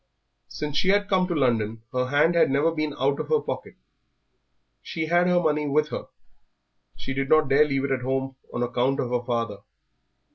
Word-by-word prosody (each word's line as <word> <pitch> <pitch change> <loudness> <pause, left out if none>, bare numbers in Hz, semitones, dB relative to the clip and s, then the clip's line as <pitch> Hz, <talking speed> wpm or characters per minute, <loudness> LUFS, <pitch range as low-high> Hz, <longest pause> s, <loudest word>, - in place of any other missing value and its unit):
Since 150 -1 -4
she 185 - +2
had 205 +1 +3
come 185 -2 +2
to 175 - -2
London 115 -5 0
her 125 0 0
hand 145 +5 +3
had 170 - +4
never 145 +5 +2
been 155 -2 -3
out 140 +2 +1
of - - -4
her 465 - +3
pocket. - - -6 1.1
She 160 -2 -4
had 175 +2 +2
her 180 0 +3
money 150 -3 0
with 150 +2 +1
her; - - -5 0.9
she 135 - -5
did 135 0 -2
not 155 -2 +4
dare 140 +2 +5
leave 135 -2 -1
it 140 - -2
at 130 -1 0
home 135 +1 -2 0.2
on 120 - -2
account 125 +3 0
of 120 - -2
her 125 -1 0
father. 115 -4 -2
140 Hz, 195 wpm, -25 LUFS, 130-160 Hz, 1.1 s, dare